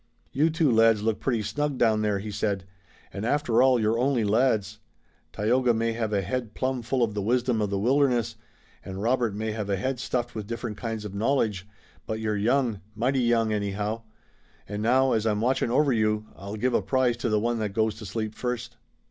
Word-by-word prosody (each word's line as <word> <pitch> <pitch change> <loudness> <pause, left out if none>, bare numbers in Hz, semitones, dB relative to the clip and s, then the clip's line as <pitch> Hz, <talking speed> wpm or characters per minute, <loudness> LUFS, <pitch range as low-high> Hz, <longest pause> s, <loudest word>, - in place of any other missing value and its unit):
"You 155 +4 +2
two 160 -3 +2
lads 115 -2 +4
look 110 -1 0
pretty 120 -5 0
snug 140 +7 -2
down 110 -3 +3
there," 105 -2 +1
he 105 +2 -5
said, 100 -1 -1 0.5
"and 100 - -5
after 125 -1 +2
all 130 -1 +5
you're 110 +1 +1
only 130 -2 +2
lads. 105 -2 +1 0.5
Tayoga 120 +3 +2
may 115 +1 0
have 110 -2 -2
a 100 -2 +1
head 115 +3 -3
plumb 130 -1 -1
full 120 +2 0
of 110 -3 0
the 105 - -2
wisdom 120 +1 +1
of 105 - 0
the 100 - -1
wilderness, 120 0 +2 0.5
and 95 0 -7
Robert 120 -3 +1
may 110 +1 -2
have 105 -2 -4
a 100 - +2
head 130 +6 -2
stuffed 120 -1 -2
with 105 -2 -6
different 115 -1 -4
kinds 115 -3 -4
of 100 - -6
knowledge, 105 -3 0 0.4
but 110 0 -3
you're 110 -1 -1
young, 115 0 +1
mighty 130 +4 +1
young, 115 -2 +2
anyhow. 105 +2 -2 0.7
An' 105 +1 -4
now, 130 +4 +3
as 110 0 +1
I'm 105 -1 +1
watching 125 +1 +1
over 135 +2 +3
you, 110 -1 +1
I'll 100 +2 -7
give 125 +4 0
a - - +3
prize 130 -2 +1
to 120 0 -2
the 110 -1 +2
one 120 +1 0
that 105 -2 -2
goes 110 0 +1
to 110 - -8
sleep 110 +1 -3
first." 120 0 -4
115 Hz, 205 wpm, -26 LUFS, 105-125 Hz, 0.7 s, all